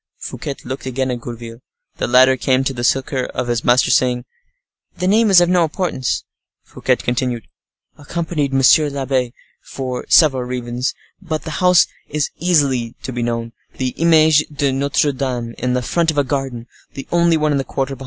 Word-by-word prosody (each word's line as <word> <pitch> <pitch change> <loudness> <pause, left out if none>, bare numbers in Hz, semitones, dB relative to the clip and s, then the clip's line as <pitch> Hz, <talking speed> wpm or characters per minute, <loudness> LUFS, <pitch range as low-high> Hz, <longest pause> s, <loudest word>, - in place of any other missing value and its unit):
Fouquet 140 - -6
looked 130 +1 -6
again 130 0 -1
at 120 -1 -4
Gourville. 115 -1 -8 0.4
The - - -2
latter 130 +2 +5
came 130 +1 +1
to 135 - -1
the 120 -1 -5
succor 130 +1 0
of 125 - -4
his 120 -2 -1
master, 125 +2 +3
saying, 125 -1 +2 0.7
["The 180 - -2
name 215 +3 +4
is 190 -3 +7
of 175 - +3
no 180 -1 +3
importance." 160 -5 -1 0.4
Fouquet - - -1
continued, 120 -2 -2 0.6
"Accompany] 160 -1 -2
monsieur 135 +3 +4
l'abbe, 135 -3 -1 0.3
for 130 -2 -5
several 135 -6 +5
reasons, 125 0 -3 0.3
but 160 -4 -4
the 160 - -6
house 180 -1 +5 0.2
is 150 0 -2
easily 140 -9 +1
to 130 - -5
be 120 - -3
known—the 115 +2 -4
'Image 155 0 +3
de 145 -2 -1
Notre 140 +2 +1
Dame' 125 -4 -3
in 125 0 0
the 125 - -1
front, 170 +5 0
a 145 - +4
garden, 135 -4 -3 0.3
the 135 - -7
only 170 -1 +3
one 155 -1 +1
in 140 - +1
the - - -1
quarter, 135 +1 -3
behind." - - -19
135 Hz, 175 wpm, -18 LUFS, 125-155 Hz, 0.7 s, is